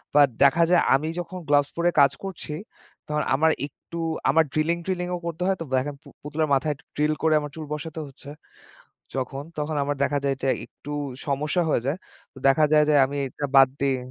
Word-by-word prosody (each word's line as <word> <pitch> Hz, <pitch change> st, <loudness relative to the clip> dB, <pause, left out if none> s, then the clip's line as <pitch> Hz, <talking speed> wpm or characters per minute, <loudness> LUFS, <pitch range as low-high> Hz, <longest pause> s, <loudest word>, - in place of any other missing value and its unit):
But 145 Hz, -1 st, +7 dB, 0.2 s
দেখা 145 Hz, +5 st, +5 dB
যায় 180 Hz, -, +6 dB
আমি 150 Hz, +3 st, -1 dB
যখন 185 Hz, +1 st, -6 dB
gloves 145 Hz, -1 st, +4 dB
পড়ে 170 Hz, +1 st, +3 dB
কাজ 140 Hz, -1 st, +6 dB
করছি, 180 Hz, -5 st, -6 dB, 0.5 s
তখন 150 Hz, 0 st, 0 dB
আমার 160 Hz, +3 st, +4 dB, 0.2 s
একটু 170 Hz, -, -12 dB, 0.3 s
আমার 160 Hz, -, +5 dB
drilling-ট্রিলিংও 175 Hz, +3 st, -1 dB
করতে 170 Hz, 0 st, -5 dB
হয়। 195 Hz, -, +2 dB, 0.2 s
দেখেন 140 Hz, +2 st, -1 dB
পু -, -, -17 dB, 0.2 s
পুতুলের 150 Hz, +1 st, -1 dB
মাথায় 140 Hz, +3 st, +2 dB
একটু 145 Hz, -, -24 dB
drill 150 Hz, +1 st, +2 dB
করে 160 Hz, -, +4 dB
আমার 145 Hz, -1 st, -6 dB
চুল 155 Hz, -1 st, -6 dB
বসাতে 160 Hz, +1 st, -5 dB
হচ্ছে 140 Hz, +1 st, -13 dB, 0.9 s
যখন, 135 Hz, +1 st, -3 dB
তখন 150 Hz, +1 st, -2 dB
আমার 145 Hz, +1 st, -1 dB
দেখা 145 Hz, 0 st, +1 dB
যায় 135 Hz, -1 st, +1 dB
যে 135 Hz, -, -1 dB, 0.2 s
একটু 145 Hz, -, -11 dB, 0.4 s
সমস্যা 150 Hz, +5 st, 0 dB
হয়ে 120 Hz, -, +2 dB
যায়। 140 Hz, +5 st, 0 dB, 0.4 s
তো -, -, -17 dB
দেখা 145 Hz, +3 st, +5 dB
যায় 150 Hz, -1 st, +6 dB
যে -, -, +4 dB
আমি 140 Hz, +2 st, -6 dB
এটা 145 Hz, +2 st, -4 dB
বাদ 135 Hz, -1 st, +9 dB
দিই। 135 Hz, -1 st, +2 dB
150 Hz, 190 wpm, -25 LUFS, 140-160 Hz, 0.9 s, বাদ